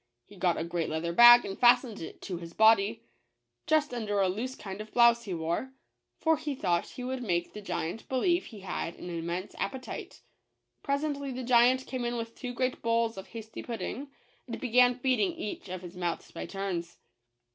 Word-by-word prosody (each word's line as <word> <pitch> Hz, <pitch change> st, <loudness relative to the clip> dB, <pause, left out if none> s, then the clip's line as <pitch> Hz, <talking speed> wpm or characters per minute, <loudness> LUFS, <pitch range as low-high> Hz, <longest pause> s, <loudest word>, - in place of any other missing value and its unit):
He 205 Hz, -, -16 dB
got 180 Hz, -2 st, +1 dB
a -, -, -1 dB
great 170 Hz, 0 st, -2 dB
leather 160 Hz, +2 st, -2 dB
bag 240 Hz, +4 st, +9 dB
and 195 Hz, -, -4 dB
fastened 240 Hz, -3 st, +4 dB
it 160 Hz, -, -9 dB
to 185 Hz, -3 st, -4 dB
his 170 Hz, 0 st, -9 dB
body, 220 Hz, -2 st, +4 dB, 0.6 s
just 310 Hz, -4 st, +2 dB
under 210 Hz, -4 st, -1 dB
a 190 Hz, -1 st, +3 dB
loose 240 Hz, +8 st, -3 dB
kind 195 Hz, 0 st, -7 dB
of 215 Hz, -, -10 dB
blouse 235 Hz, -1 st, +5 dB
he 195 Hz, -, -4 dB
wore, 170 Hz, +11 st, -2 dB, 0.4 s
for 320 Hz, -1 st, +2 dB
he 300 Hz, -2 st, -4 dB
thought 175 Hz, -7 st, 0 dB
he 250 Hz, -, -8 dB
would 260 Hz, 0 st, -3 dB
make 175 Hz, -6 st, -1 dB
the 210 Hz, -, -7 dB
giant 180 Hz, +1 st, -4 dB
believe 345 Hz, +8 st, +1 dB
he 215 Hz, -4 st, -11 dB
had 175 Hz, -2 st, -4 dB
an 175 Hz, -, -8 dB
immense 170 Hz, +3 st, -4 dB
appetite. 265 Hz, -1 st, -5 dB, 0.6 s
Presently 280 Hz, -1 st, -2 dB
the 255 Hz, 0 st, -5 dB
giant 250 Hz, +2 st, +4 dB
came 255 Hz, -2 st, -4 dB
in 240 Hz, 0 st, -1 dB
with 230 Hz, 0 st, -5 dB
two 250 Hz, +1 st, -6 dB
great 255 Hz, +1 st, -2 dB
bowls 230 Hz, 0 st, +1 dB
of 190 Hz, 0 st, -8 dB
hasty 220 Hz, -1 st, -8 dB
pud 235 Hz, -2 st, -5 dB
ding, 260 Hz, +8 st, -5 dB, 0.4 s
and 235 Hz, -, -5 dB
began 250 Hz, 0 st, +4 dB
feeding 250 Hz, -6 st, +1 dB
each 205 Hz, -2 st, -6 dB
of 185 Hz, 0 st, -6 dB
his 175 Hz, 0 st, -9 dB
mouths 175 Hz, -2 st, -3 dB
by -, -, -6 dB
turns. 180 Hz, -4 st, -4 dB
225 Hz, 195 wpm, -29 LUFS, 180-250 Hz, 0.6 s, bag